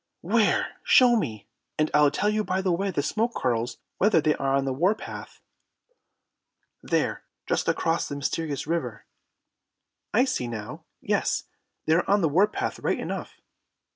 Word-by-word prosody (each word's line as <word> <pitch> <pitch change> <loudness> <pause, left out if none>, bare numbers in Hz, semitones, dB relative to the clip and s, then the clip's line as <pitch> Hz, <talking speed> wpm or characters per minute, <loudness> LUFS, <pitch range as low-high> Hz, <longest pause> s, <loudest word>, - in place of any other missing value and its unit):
"Where? 215 +5 +1
Show 255 - +6
me, 110 - -3 0.3
and 155 0 +1
I'll 150 -1 +5
tell 205 +8 0
you 215 0 0
by 190 -1 -1
the 185 - +1
way 195 +3 0
smoke 215 - -1
curls 120 -1 -1 0.2
whether 210 -3 +4
they 155 0 +2
are 135 -1 0
on 135 0 +1
the 135 - -1
war 180 +10 +2
path." - - -9 1.4
"There, - - -1 0.2
just - - -1
across 165 +1 0
the 145 - -5
Mysterious 145 +1 -2
River." 145 -9 -3 1.1
"I 245 +5 +4
see 190 - -2
now. 110 -3 -7 0.2
Yes, - - 0 0.4
they 155 - +3
are 170 +2 +1
on 200 +1 +4
the 165 - +2
war 185 +8 +4
path 210 - -4
right - - -1
enough." - - -5
165 Hz, 160 wpm, -26 LUFS, 140-205 Hz, 1.4 s, Show